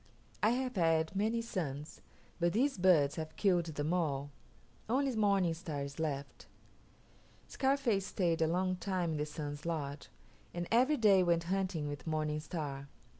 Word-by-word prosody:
I 215 - +4
have 250 -1 -1
had 165 0 +2
many 220 +4 +1
sons, 150 -9 -5 0.4
but 175 0 +2
these 260 0 +1
birds 165 -6 +4
have 155 -1 -5
killed 180 -4 +2
them 155 0 -2
all. 145 -5 -1 0.6
Only 265 +1 +1
Morning 200 -5 +3
Star 155 -4 -4
is 140 +1 -7
left." 140 -3 -4 1.0
Scarface 265 -8 +1
stayed 170 -4 0
a 160 - +4
long 185 +2 0
time 180 -3 -1
in 155 - -2
the 150 0 -2
Sun's 145 -1 -6
lodge, 145 -4 -4 0.5
and 175 0 -3
every 260 +6 +4
day 205 -5 +5
went 170 -2 +2
hunting 185 -6 -1
with 145 +2 -6
Morning 155 -1 -1
Star. 145 -4 -5
170 Hz, 155 wpm, -33 LUFS, 150-195 Hz, 1.0 s, day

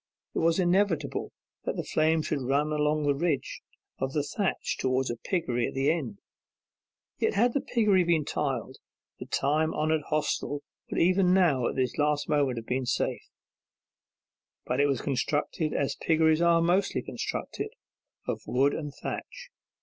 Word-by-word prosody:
It - - -1
was 165 0 +3
inevitable 185 -1 +1 0.3
that - - -1
the - - -2
flame 160 0 +2
should 150 -3 -2
run 140 +4 +1
along 150 0 +1
the 145 -1 +3
ridge 150 -1 -1 0.4
of 135 0 -2
the 150 - +1
thatch 180 +5 -2
towards 130 -1 +1
a - - -3
piggery 120 -4 -1
at - - -7
the 135 +3 +3
end. 135 -11 -3 1.0
Yet - - +1
had 235 +4 +3
the 280 - +1
piggery 210 -6 +3
been 165 -3 +2
tiled, 130 -3 -2 0.4
the - - -7
time 155 +3 +1
honoured 155 0 +1
hostel 145 -1 -1 0.3
would - - -1
even 185 +1 +4
now 150 -10 +3
at - - -3
this 130 +2 -1
last 150 0 +1
moment 140 -5 +1
have 115 - -5
been 130 +1 -2
safe; - - -1 1.4
but 125 +2 -1
it 145 - +4
was 135 -4 0
constructed 145 +3 -1
as 140 - 0
piggeries 160 0 +3
are 170 -1 +4
mostly 185 +3 +1
constructed, 430 - -4 0.6
of - - -2
wood 135 +3 +2
and 150 -3 -5
thatch. - - -6
150 Hz, 160 wpm, -28 LUFS, 135-170 Hz, 1.4 s, even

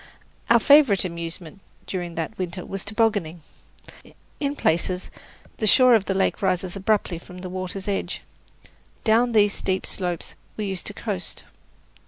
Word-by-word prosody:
Our 235 - +7
favourite 270 -8 +6
amusement 170 0 -6 0.3
during 175 -3 -4
that 165 +6 -3
winter 180 0 -4
was 195 0 -3
tobogganing. 205 -7 0 1.0
In 285 -1 -1
places 180 - 0 0.5
the 215 - 0
shore 255 +3 +7
of 215 -4 +4
the 195 - -1
lake 195 - +1
rises 185 -1 0
abruptly 195 -3 0
from 180 +1 -13
the 185 - -6
water's 185 +1 -5
edge. 200 -1 -2 0.8
Down 235 +2 +3
these 205 -2 +4
steep 190 0 -1
slopes 180 -3 -1 0.2
we 215 - -2
used 190 -2 -3
to 210 - -6
coast. 195 -7 -5
195 Hz, 145 wpm, -24 LUFS, 180-215 Hz, 1.0 s, Our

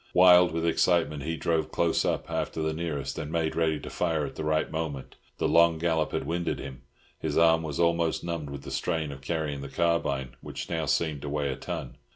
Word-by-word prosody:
Wild 90 -1 +7
with 80 +1 -1
excitement, 85 -3 +2
he 80 +3 -3
drove 80 -2 0
Close 85 -1 +1
Up - - -1
after - - -2
the 80 0 0
nearest, 80 -4 -3
and 75 0 -5
made 80 -1 0
ready 80 -2 +1
to - - -7
fire 80 -4 0
at - - -6
the - - -4
right 80 0 0
moment. 80 -4 -4 0.2
The - - +1
long 85 -1 +5
gallop 80 -2 0
had - - -2
winded 85 +1 -1
him; 65 -1 -8 0.4
his - - -2
arm 80 -1 +5
was 75 -3 -4
almost 85 -1 +2
numbed 85 -4 -4
with 70 -1 -7
the 70 - -7
strain 80 +3 -1
of 70 -1 -9
carrying 75 -2 -2
the 70 - -7
carbine, 75 -5 0
which - - -7
now 80 -2 -1
seemed 75 +1 0
to 70 - -5
weigh 70 -1 -1
a - - -3
ton. - - -6
80 Hz, 215 wpm, -28 LUFS, 75-85 Hz, 0.4 s, Wild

